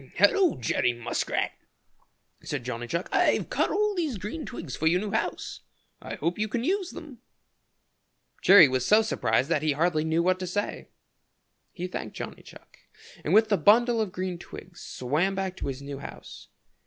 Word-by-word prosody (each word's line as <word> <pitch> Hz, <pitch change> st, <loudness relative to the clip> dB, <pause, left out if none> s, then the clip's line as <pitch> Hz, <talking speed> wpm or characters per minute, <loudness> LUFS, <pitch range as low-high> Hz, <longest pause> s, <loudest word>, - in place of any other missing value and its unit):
"Hello, 315 Hz, -, +4 dB
Jerry 120 Hz, +1 st, +1 dB
Muskrat," 120 Hz, -1 st, -2 dB, 0.9 s
said 145 Hz, -4 st, -4 dB
Johnny 120 Hz, -1 st, -4 dB
Chuck. 170 Hz, +9 st, -2 dB
"I've -, -, +2 dB
cut -, -, +1 dB
all 420 Hz, 0 st, +1 dB
these 320 Hz, -, -2 dB
green 210 Hz, -, -6 dB
twigs 165 Hz, -, -6 dB
for 160 Hz, -, 0 dB
your 175 Hz, +3 st, +3 dB
new 205 Hz, +1 st, -4 dB
house. 220 Hz, -, -3 dB, 0.4 s
I -, -, -6 dB
hope 175 Hz, +4 st, -2 dB
you 215 Hz, -, +1 dB
can 230 Hz, +2 st, -2 dB
use 375 Hz, +4 st, 0 dB
them." 285 Hz, -7 st, -10 dB, 1.2 s
Jerry 190 Hz, -6 st, +9 dB
was 130 Hz, -1 st, -1 dB
so 215 Hz, +9 st, +5 dB
surprised 125 Hz, -, +1 dB
that 155 Hz, -3 st, +1 dB
he 155 Hz, -1 st, +1 dB
hardly 155 Hz, +1 st, +1 dB
knew 160 Hz, +1 st, +1 dB
what 185 Hz, +1 st, +2 dB
to 185 Hz, -, -4 dB
say. 205 Hz, +4 st, -3 dB, 0.8 s
He 180 Hz, -, -5 dB
thanked 180 Hz, -, -6 dB
Johnny -, -, -7 dB
Chuck, -, -, -16 dB, 0.4 s
and -, -, -2 dB
with 220 Hz, +1 st, +5 dB
the 205 Hz, -, +3 dB
bundle 230 Hz, +3 st, +4 dB
of 210 Hz, -4 st, -2 dB
green 185 Hz, -1 st, -4 dB
twigs 175 Hz, 0 st, -11 dB
swam 155 Hz, +10 st, -1 dB
back 190 Hz, -1 st, -3 dB
to -, -, -4 dB
his 135 Hz, 0 st, -5 dB
new 140 Hz, -1 st, -6 dB
house. -, -, -10 dB
185 Hz, 180 wpm, -27 LUFS, 150-220 Hz, 1.2 s, Jerry